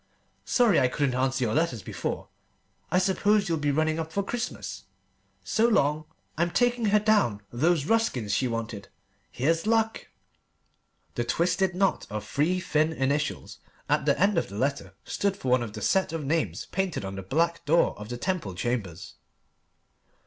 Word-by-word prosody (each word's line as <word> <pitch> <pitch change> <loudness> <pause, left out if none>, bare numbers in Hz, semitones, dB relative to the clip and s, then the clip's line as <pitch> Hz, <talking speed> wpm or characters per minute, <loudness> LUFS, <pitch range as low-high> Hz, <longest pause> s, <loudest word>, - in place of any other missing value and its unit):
Sorry 240 -4 +4
I 130 - +4
couldn't 135 +1 0
answer 130 +1 0
your 110 -2 0
letter 155 -5 +1
before. 100 - -5 0.6
I - - +2
suppose 200 +2 +2
you'll 165 -2 0
be 145 0 0
running 155 +2 +1
up 160 0 -4
for 200 - -1
Christmas! 240 +4 -5 0.6
So 225 +1 +2
long! 155 -8 +2 0.3
I'm 170 +1 +2
taking 245 +3 +1
her 210 0 +4
down 205 - +2
those 155 +4 +2
Ruskins 145 - +1
she 130 +5 +1
wanted. 115 -3 -4 0.4
Here's 165 - 0
luck!" 225 0 +1 1.1
The 120 - -1
twisted 175 +8 +1
knot 195 +1 +1
of 105 +1 -5
three 165 +6 +1
thin 155 -3 +1
initials 140 +1 -2 0.3
at - - +1
the - - +3
end 200 -1 +3
of - - -4
the 100 - -8
letter 140 +4 -2
stood 200 -1 -1
for 130 - -4
one 125 0 +4
of 110 -3 -5
the 105 -2 -6
set 190 -3 +2
of 160 -3 -3
names 160 +3 -1
painted 190 - -2
on 95 - -5
the 95 - -5
black 165 - 0
door 165 +4 +3
of 105 +1 -8
the 120 - -4
Temple 170 - -2
Chambers. 95 -4 -4
155 Hz, 170 wpm, -27 LUFS, 125-190 Hz, 1.1 s, Sorry